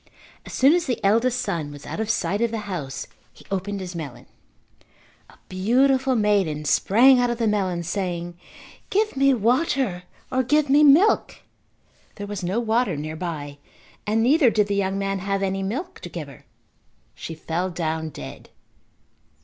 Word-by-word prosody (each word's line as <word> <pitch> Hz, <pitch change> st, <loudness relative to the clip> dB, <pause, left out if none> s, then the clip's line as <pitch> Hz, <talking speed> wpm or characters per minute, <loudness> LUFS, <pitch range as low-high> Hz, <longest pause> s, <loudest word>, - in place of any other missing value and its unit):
As -, -, -9 dB
soon 275 Hz, +4 st, +5 dB
as 350 Hz, -2 st, 0 dB
the 245 Hz, -, -1 dB
eldest 230 Hz, +5 st, +2 dB
son 155 Hz, -4 st, -3 dB
was 145 Hz, 0 st, -11 dB
out -, -, -6 dB
of 220 Hz, -1 st, -2 dB
sight 215 Hz, -1 st, 0 dB
of 235 Hz, -, +2 dB
the 225 Hz, -1 st, -4 dB
house 155 Hz, -9 st, -5 dB, 0.3 s
he -, -, -18 dB
opened 200 Hz, +1 st, -2 dB
his 185 Hz, -1 st, -6 dB
melon. 155 Hz, -7 st, -7 dB, 1.0 s
A -, -, -19 dB
beautiful 260 Hz, +7 st, +2 dB
maiden 195 Hz, -9 st, +1 dB
sprang 250 Hz, -, +5 dB
out 245 Hz, 0 st, +2 dB
of 240 Hz, -, -2 dB
the 230 Hz, -, 0 dB
melon 190 Hz, -5 st, 0 dB
saying, 175 Hz, -1 st, -3 dB, 0.5 s
"Give 425 Hz, -1 st, 0 dB
me 275 Hz, 0 st, +4 dB
water 245 Hz, -, +1 dB, 0.3 s
or 260 Hz, -, +2 dB
give 295 Hz, +2 st, +1 dB
me 290 Hz, +2 st, +6 dB
milk." 305 Hz, +9 st, +4 dB, 0.7 s
There 205 Hz, -, -6 dB
was 205 Hz, -2 st, -6 dB
no 185 Hz, +6 st, 0 dB
water 230 Hz, -4 st, +1 dB
nearby 155 Hz, -2 st, -5 dB, 0.5 s
and 220 Hz, +2 st, +2 dB
neither 275 Hz, +1 st, +5 dB
did 215 Hz, -2 st, +2 dB
the 205 Hz, -, -2 dB
young 195 Hz, -1 st, 0 dB
man 195 Hz, 0 st, -2 dB
have 195 Hz, +1 st, -2 dB
any 195 Hz, 0 st, -1 dB
milk 275 Hz, -, -4 dB
to -, -, -8 dB
give -, -, -6 dB
her. -, -, -15 dB, 0.7 s
She 165 Hz, -, -7 dB
fell 170 Hz, +3 st, -3 dB
down 160 Hz, -2 st, -3 dB
dead. -, -, -10 dB
205 Hz, 165 wpm, -23 LUFS, 175-250 Hz, 1.0 s, me